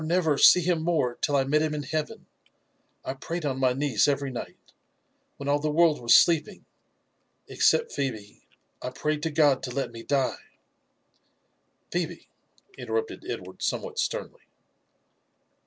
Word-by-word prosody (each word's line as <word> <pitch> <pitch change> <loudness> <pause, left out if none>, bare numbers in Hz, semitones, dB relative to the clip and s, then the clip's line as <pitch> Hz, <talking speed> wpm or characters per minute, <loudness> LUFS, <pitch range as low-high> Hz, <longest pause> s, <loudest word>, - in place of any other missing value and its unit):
never 160 -1 +1
see 180 - +7
him 170 -1 0
more 160 -7 0
till 145 - +1
I 135 - +3
met 150 +3 +1
him 155 -1 -1
in 145 - -4
heaven, 155 +1 -4 0.8
I 130 - -3
prayed 165 +5 -5
on 135 -2 -2
my 130 -1 +2
knees 135 -4 +1
every 140 -1 -1
night, 120 - -9 0.6
when 140 - -7
all 145 +1 +2
the 155 +1 -1
world 155 -1 +3
was 120 - +5
sleeping, 170 +4 +3 0.8
exeept 470 0 +2
Pb^be 110 -7 -4 0.2
— - - -46
I - - -4
prayed 150 +3 -2
to 160 - -1
God 145 -4 +3
to 130 - -5
let 130 0 -3
me 115 -1 -9
die 135 +2 -1 0.7
*" - - -45
"Phebe! - - -3 0.3
" 400 - -29
interrupted 450 0 -4
Edward - - -7
somewhat 465 -2 -3
sternly. - - -3
150 Hz, 155 wpm, -26 LUFS, 135-165 Hz, 0.8 s, see